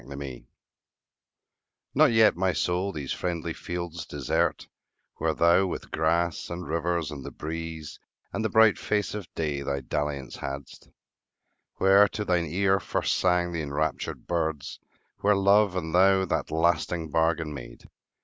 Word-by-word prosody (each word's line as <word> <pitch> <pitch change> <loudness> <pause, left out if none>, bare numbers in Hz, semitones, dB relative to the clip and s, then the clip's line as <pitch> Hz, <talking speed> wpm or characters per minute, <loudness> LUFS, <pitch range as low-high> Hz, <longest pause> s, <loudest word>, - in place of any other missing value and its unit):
XXIV 70 -3 -8 1.5
NOT 150 -1 +5
yet, 110 -1 +5
my 95 +1 +1
soul, 90 +3 0
these 75 -6 -4
friendly 85 -2 -3
fields 85 0 -5
desert, 70 -3 -1 0.5
Where 80 -1 0
thou 85 +3 +4
with - - -6
grass, 85 +1 0
and 85 0 -6
rivers, 85 0 -1
and 70 -3 -7
the - - -6
breeze, 80 -1 -6 0.3
And - - -2
the 110 - +1
bright 110 -1 +5
face 105 -1 -1
of 105 -5 -7
day, 75 -3 -2
thy 70 0 -2
dalliance 70 0 -3
hadst; 70 +1 -7 0.9
Where 100 +2 +6
to 105 +1 -4
thine 90 -3 +1
ear 95 +4 +2
first - - -1
sang 90 -1 +2
the 85 -2 -2
enraptured 75 +1 -3
birds; 80 -4 -2 0.4
Where 105 0 +3
love 100 0 +4
and 80 -3 -3
thou 95 +1 +5
that - - -2
lasting 80 0 0
bargain 80 -1 +1
made. - - -10
85 Hz, 145 wpm, -27 LUFS, 75-95 Hz, 1.5 s, Where